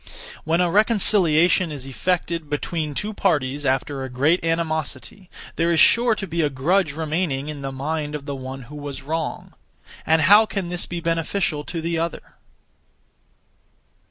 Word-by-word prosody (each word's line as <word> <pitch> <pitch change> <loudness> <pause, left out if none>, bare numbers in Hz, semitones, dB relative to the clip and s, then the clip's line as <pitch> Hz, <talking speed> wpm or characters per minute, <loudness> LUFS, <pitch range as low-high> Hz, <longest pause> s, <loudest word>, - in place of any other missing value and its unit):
When 165 +3 +2
a 175 -1 +1
reconciliation 185 -5 +3
is 140 -3 -6
effected 165 +2 -2
(between 150 0 -3
two 210 +6 -2
parties) 145 -8 0
after 135 +1 -1
a 130 - -5
great 145 +8 +1
animosity, 165 0 -3 0.3
there 170 +1 +2
is 165 - +2
sure 235 -1 +5
to 200 - -4
be 170 -2 -2
a 150 - +2
grudge 155 +5 +1
remaining 155 -2 -2
(in 150 -2 -6
the 135 0 -4
mind 150 +2 -3
of 145 -2 -6
the 140 - -4
one 130 0 -7
who 145 +5 -12
was 140 -2 -7
wrong). 160 +1 -4 0.5
And 160 0 +3
how 205 +5 +7
can 195 -5 -4
this 175 0 -3
be 175 -1 -5
beneficial 165 -1 -1
(to 170 -2 -4
the 165 0 -1
other)? 165 0 -4
160 Hz, 160 wpm, -22 LUFS, 145-175 Hz, 0.5 s, how